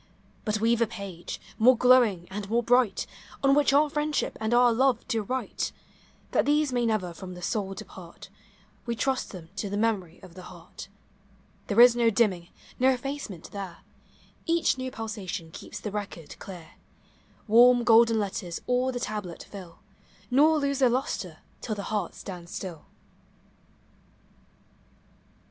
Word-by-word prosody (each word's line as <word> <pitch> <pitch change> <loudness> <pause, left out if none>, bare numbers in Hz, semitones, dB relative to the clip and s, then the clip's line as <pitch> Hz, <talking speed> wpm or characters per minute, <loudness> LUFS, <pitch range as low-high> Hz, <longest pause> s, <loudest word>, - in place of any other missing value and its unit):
Rut 215 0 0
we 230 +2 +3
've 235 - -4
a 230 - +3
page, 195 -5 -7 0.2
more 245 +2 +6
glowing 240 -8 +4
and 200 0 -5
more 235 +2 +1
bright, 245 -3 +2 0.4
On 275 0 +5
which 285 -1 +4
our 290 +2 +5
friendship 295 0 -1
and 220 +1 -1
our 240 0 +5
love 255 0 +1
to 225 -3 0
write; 255 +5 -3 0.6
That - - +2
these 295 -2 +2
may 240 -1 +1
never 195 -6 -1
from 180 +2 -9
the 180 - -10
soul 195 -3 -2
depart. 175 -2 -11 0.6
We 235 - -1
trust 265 +2 -1
them 170 -4 -10
to 200 - -3
the 205 - -3
memory 205 -6 -1
of 185 -3 -13
the 185 - -10
heart. 175 +1 -11 0.8
There 205 - +1
is 240 0 +9
no 235 -1 +3
dimming, 195 -6 +1 0.3
no 260 +1 +5
effacement 260 - -4
there; 195 -4 -7 0.7
Each 335 -3 +2
new 260 0 -4
pulsation 205 -8 -6
keeps - - -9
the 210 - -5
record 200 -6 -6
clear; 175 -5 -10 0.8
Warm, 240 +2 +6
golden 230 0 +5
letters 190 -4 -3
all 250 +1 +1
the 245 - -4
tablet 210 -7 -5
fill, 185 -4 -11 0.5
Nor 305 +5 +5
lose 280 -2 -1
their 260 -2 +5
lustre 255 +3 -3 0.2
till 215 - -3
the 200 - -5
heart 205 -5 -2
stands 175 -3 -9
still. 175 -6 -7
225 Hz, 155 wpm, -27 LUFS, 190-250 Hz, 0.8 s, is